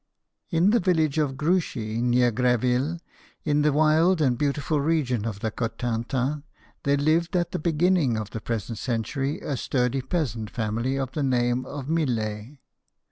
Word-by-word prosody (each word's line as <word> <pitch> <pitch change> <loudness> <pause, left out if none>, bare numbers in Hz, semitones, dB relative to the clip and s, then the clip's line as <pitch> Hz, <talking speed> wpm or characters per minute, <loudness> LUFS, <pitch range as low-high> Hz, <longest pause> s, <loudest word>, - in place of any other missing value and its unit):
In 175 +3 +3
the 235 - +4
village 160 -6 +1
of 135 -3 0
Gruchy, 135 -9 0
near 120 0 +3
Greville, 125 +6 +1 0.5
in 150 -1 +2
this 150 0 +3
wild 155 +4 +4
and 130 -5 +2
beautiful 145 +2 0
region 140 -8 0
of 100 -3 -5
the 110 - -1
Cotentin, 120 +5 -2 0.4
there 140 0 +2
lived 165 +5 +1
at 175 -1 +1
the - - -2
beginning 160 -5 +2
of 105 -2 -5
the 110 - -5
present 115 0 -4
century 135 +4 -2
a 145 - -2
sturdy 125 +1 0
peasant 125 - -2
family 115 +3 -2
of 135 -1 -2
the 150 - -3
name 125 -2 +1
of 140 -2 -6
Millet. 120 -5 -2
135 Hz, 155 wpm, -25 LUFS, 120-155 Hz, 0.5 s, the